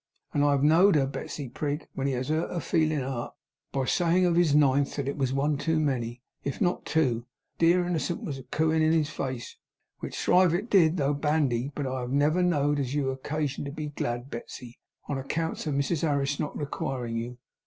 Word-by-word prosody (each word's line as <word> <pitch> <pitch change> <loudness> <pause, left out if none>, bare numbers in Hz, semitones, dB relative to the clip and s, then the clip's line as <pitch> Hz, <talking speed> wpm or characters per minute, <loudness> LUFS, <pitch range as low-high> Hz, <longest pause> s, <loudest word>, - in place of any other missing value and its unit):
And 145 - +2
I 145 0 +4
have 140 -1 +1
know'd 165 +5 +6
her, 140 -3 +4
Betsey 140 +1 -5
Prig, 145 +4 -3
when 135 0 -2
he 135 - 0
has 130 +2 -3
hurt 160 +2 0
her 175 - -2
feelin' 155 -4 +1
art 130 -2 -4 0.4
by 135 -1 -1
sayin' 175 +5 +3
of 175 -1 +2
his 170 -4 +4
Ninth 140 -1 +3
that 140 -2 -3
it 140 - -2
was 135 -3 0
one 140 +2 0
too 160 0 +1
many, 125 -5 -2 0.2
if 140 - -3
not 180 -2 0
two, 160 -4 +3
while 115 - -3
that 120 +1 -24
dear 175 +2 +4
innocent 175 +4 -2
was 140 -9 -4
cooin' 160 0 +2
in 155 0 +4
his 155 -2 +1
face, 130 -5 -5 0.4
which - - -6
thrive 180 -1 +4
it 205 +7 -3
did 175 -3 +5
though 145 -1 +1
bandy, 145 -3 0
but 145 - -2
I 130 0 -2
have 125 0 -4
never 150 +5 +3
know'd 145 -5 +2
as 135 0 -2
you 140 -2 +1
had 130 0 -5
occagion 150 -2 -2
to 140 - -4
be 150 0 -5
glad, 120 -2 -4
Betsey, 120 +1 -8 0.3
on 140 -2 -2
accounts 160 +4 -3
of 145 - 0
Mrs 140 +3 0
Harris 145 -2 0
not 150 - -3
requiring 135 -5 -3
you. 120 +2 -5
145 Hz, 215 wpm, -27 LUFS, 135-160 Hz, 0.4 s, know'd